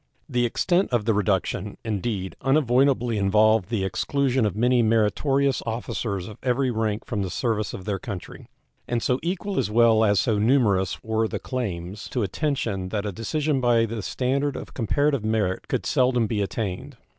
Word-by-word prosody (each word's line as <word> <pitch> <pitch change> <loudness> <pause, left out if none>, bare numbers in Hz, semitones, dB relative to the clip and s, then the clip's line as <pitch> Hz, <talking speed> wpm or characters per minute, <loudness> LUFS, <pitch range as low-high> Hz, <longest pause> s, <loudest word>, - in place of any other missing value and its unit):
The 125 -4 +1
extent 180 +10 +1
of 120 -4 +1
the 115 - +3
reduction, 100 0 -1
indeed, 100 -3 -3
unavoidably 130 -4 +2
involved 105 0 +3
the 110 -5 -1
exclusion 125 +6 0
of 100 - -4
many 120 +2 +3
meritorious 125 +5 +2
officers 110 -4 -3
of 105 - -10
every 130 0 +1
rank 110 -2 -2
from 105 -4 -2
the 95 - -2
service 110 -2 -1
of 95 - -8
their 100 -2 -2
country; 95 -3 -8 0.4
and 120 -1 -1
so 125 +1 +1
equal 190 +3 -2
as - - 0
well 110 0 +4
as 105 -2 +3
so 110 -4 +1
numerous 105 -6 +2
were 110 0 0
the - - -4
claims 100 -6 -5
to 125 - -1
attention 105 - -2
that 105 +1 -2
a 105 - -2
decision 140 - -1
by 120 -2 +3
the 115 0 -4
standard 135 +6 -1
of - - -8
comparative 140 +2 +1
merit 110 -4 -1
could - - -2
seldom 125 -2 +2
be 105 -1 -1
attained. 110 +6 -4
115 Hz, 170 wpm, -24 LUFS, 105-130 Hz, 0.4 s, well